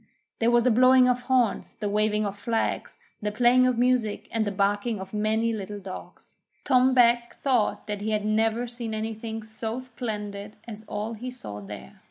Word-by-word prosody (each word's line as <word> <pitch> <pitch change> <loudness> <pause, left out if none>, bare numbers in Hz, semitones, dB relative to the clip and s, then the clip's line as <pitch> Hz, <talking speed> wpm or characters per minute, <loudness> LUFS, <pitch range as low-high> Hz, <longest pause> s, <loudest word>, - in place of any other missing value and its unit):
There 230 - +3
was 240 0 +4
the 250 - +4
blowing 255 +2 +6
of 250 0 +1
horns, 245 -4 +1
the 210 - -3
waving 210 +1 +1
of 200 0 -3
flags, 225 +2 -2 0.2
the 210 0 -1
playing 245 +3 +4
of 250 -2 +1
music, 245 -3 +1
and 225 -1 0
the - - 0
barking 205 +3 0
of 190 +2 -8
many 220 +2 +1
little 205 -1 -5
dogs. 190 -1 -10 0.3
Tom 260 -1 +4
Beg 240 -1 +4
thought 250 -6 0
that 205 -1 -4
he 215 - -2
had 210 -1 0
never 220 +2 +1
seen 235 -2 -5
anything 220 0 -4
so 220 +1 -5
splendid 210 -5 -5
as 215 -2 -8
all 215 +2 -3
he 240 +3 -6
saw 175 - -8
there. 100 -9 -10
220 Hz, 185 wpm, -26 LUFS, 210-245 Hz, 0.3 s, blowing